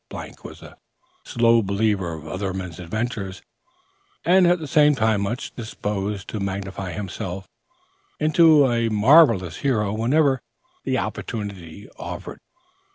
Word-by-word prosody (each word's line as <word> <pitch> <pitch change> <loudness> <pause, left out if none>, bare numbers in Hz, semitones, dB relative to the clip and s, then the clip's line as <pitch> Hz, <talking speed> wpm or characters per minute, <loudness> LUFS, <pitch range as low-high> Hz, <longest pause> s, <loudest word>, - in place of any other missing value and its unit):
was - - -11
a - - -13 0.5
slow 115 -1 +3
believer 100 -3 0
of 80 -1 -9
other 95 +2 -3
men's 90 -3 -6
adventures, 100 +1 -4 0.8
and, 180 0 +5
at 175 +1 +4
the 160 - -7
same 150 +1 +4
time, 110 -4 +1
much 115 +6 -4
disposed 105 -3 -4
to 110 - -5
magnify 95 -1 -4
himself 95 0 -6 0.7
into 155 -1 +5
a 115 -2 +1
marvellous 110 - +5
hero 105 -7 0
whenever 130 +4 +2 0.4
the - - 0
opportunity 100 -4 -5
offered. - - -7
105 Hz, 120 wpm, -23 LUFS, 95-125 Hz, 0.8 s, and